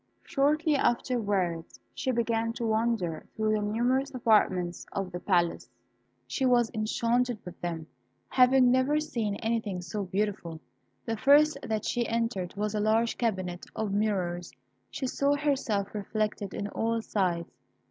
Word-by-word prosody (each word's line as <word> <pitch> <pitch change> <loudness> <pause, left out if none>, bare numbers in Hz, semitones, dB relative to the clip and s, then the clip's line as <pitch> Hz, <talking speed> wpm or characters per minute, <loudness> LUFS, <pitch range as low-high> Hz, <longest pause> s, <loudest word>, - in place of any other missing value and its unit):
Shortly 300 +2 +2
afterwards 205 -10 0
she - - -3
began 230 -2 0
to 235 0 -3
wander 220 -7 0
through 215 0 +1
the 215 - +1
numerous 245 +6 +1
apartments 190 -7 +2
of 195 -2 -3
the 175 - -5
palace. 175 - +1 0.6
She 125 - -3
was 245 -3 +3
enchanted 235 +2 0
with 180 -1 -10
them, 165 -2 -3 0.4
having 255 -1 +5
never 260 +4 +3
seen 230 -9 -2
anything 220 -4 -2
so 195 +4 -4
beautiful. 190 -4 -2 0.5
The 225 -1 -2
first 290 +5 +5
that 220 -3 -2
she 240 -1 0
entered 230 -6 -2
was 210 +1 -2
a 210 - 0
large 220 +2 +2
cabinet 185 -6 -2
of 215 -3 -2
mirrors. 185 -5 -1 0.4
She - - -4
saw 280 +2 +1
herself 270 -9 0
reflected 210 -1 -2
on 200 - -3
all 230 +2 -1
sides. 175 -6 -1
220 Hz, 140 wpm, -29 LUFS, 195-245 Hz, 0.6 s, having